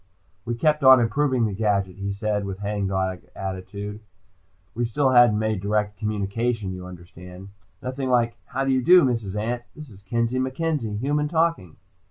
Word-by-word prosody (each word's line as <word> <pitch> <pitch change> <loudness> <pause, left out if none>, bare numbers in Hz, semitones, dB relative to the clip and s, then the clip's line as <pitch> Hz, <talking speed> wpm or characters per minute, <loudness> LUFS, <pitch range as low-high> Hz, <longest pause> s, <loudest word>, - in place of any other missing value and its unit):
"We 120 0 -2
kept 150 +4 +1
on 130 -1 +9
improving 125 +1 +1
the 105 - -2
gadget," 100 -3 0
he 100 0 -3
said 105 0 -2
with 95 -1 -5
hangdog 95 -2 -2 0.2
attitude. 100 +2 -6 0.7
"We 120 - -2
still 130 +3 +1
hadn't 120 -4 +6
made 110 -2 -1
direct 105 0 -1
communication, 105 0 -2
you 90 0 -8
understand. 90 +1 -12 0.3
Nothing 130 +1 -3
like 120 -2 +2
'How 135 0 -3
do 135 - +1
you 130 -1 +2
do, 180 +6 +7
Mrs. 115 -7 -1
Ant? 115 +3 -2
This 150 -5 -11
is 100 -1 -15
Kenzie 115 +5 -1
MacKenzie, 130 -4 -2
human, 145 +5 0
talking.'" 160 - 0
110 Hz, 165 wpm, -24 LUFS, 100-130 Hz, 0.7 s, on